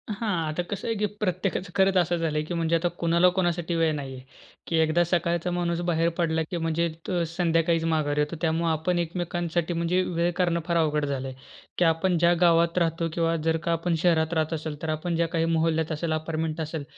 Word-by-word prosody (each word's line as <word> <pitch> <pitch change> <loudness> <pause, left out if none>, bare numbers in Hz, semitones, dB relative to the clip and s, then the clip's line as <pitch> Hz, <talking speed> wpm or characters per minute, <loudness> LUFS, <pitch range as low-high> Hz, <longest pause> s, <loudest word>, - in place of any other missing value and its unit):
हां, 210 -2 -1 0.2
आता 175 +3 -2
कसं 200 +5 -5
आहे 230 - 0
की 210 - +1 0.2
प्रत्येकाचं 185 -1 -1
खरंच 190 0 +3
असं 175 -1 +2
झालं 155 -2 -1
की 175 - -4
म्हणजे 165 0 +1
आता 165 +1 +1
कोणाला 170 +2 +4
कोणासाठी 175 -1 0
वेळ 165 -1 +2
नाही 135 -2 -5
आहे. 130 - -9 0.5
की 165 - -1
एकदा 160 +2 +3
सकाळचा 170 0 0
माणूस 175 -1 -1
बाहेर 165 0 +2
पडला 160 -2 +1
की 175 - -1
म्हणजे 165 +1 0 0.2
तो 175 -3 0
संध्याकाळीच 165 -1 +1
माघारी 150 -2 0
येतो. 150 +3 -2
त्यामुळं 165 0 +1
आपण 175 +3 0
एकमेकांसाठी 175 0 -2
म्हणजे 170 +2 +1
वेळ 170 -1 0
काढणं 175 -2 +1
फार 170 -1 +1
अवघड 150 -2 +1
झालंय. 135 -2 -3 0.4
की 175 - +3
आपण 170 +2 +2
ज्या 170 +1 +4
गावात 170 0 +4
राहतो 165 -1 +1
किंवा 165 0 +1
जर 160 - +3
का 170 - 0
आपण 165 +1 0
शहरात 165 -2 +2
राहत 160 0 0
असेल, 155 -2 -5
तर 160 - -3
आपण 155 +2 -2
ज्या 170 0 +1
काही 165 0 0
मोहल्ल्यात 160 0 +1
असेल, 160 +1 -2
अपार्टमेंट 160 0 -2
असेल, 155 -1 -4
165 Hz, 205 wpm, -26 LUFS, 160-175 Hz, 0.5 s, कोणाला